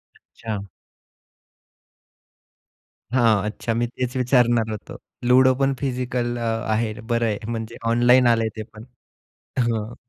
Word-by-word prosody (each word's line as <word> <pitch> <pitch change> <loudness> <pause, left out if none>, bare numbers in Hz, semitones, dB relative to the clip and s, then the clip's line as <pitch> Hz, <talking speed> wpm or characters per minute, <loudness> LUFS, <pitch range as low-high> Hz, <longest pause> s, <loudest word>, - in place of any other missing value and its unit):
अच्छा. 110 -3 -7 2.5
हां, 115 -5 +3
अच्छा, 110 +2 -3
मी 120 +1 0
तेच 125 +1 -4
विचारणार 120 -3 +3
होतो. 105 - -7 0.3
लुडो 130 +1 +6
पण 135 0 +2
फिजिकल 125 -2 -2
अ, - - -5 0.3
आहे, 110 0 0
बरं 115 +1 0
आहे, 105 -2 -1
म्हणजे 115 0 -5
ऑनलाइन 120 +2 +5
आलंय 115 -1 +3
ते 110 - -4
पण, 110 0 -11 0.8
हं. 115 -2 -1
120 Hz, 120 wpm, -22 LUFS, 110-125 Hz, 2.5 s, लुडो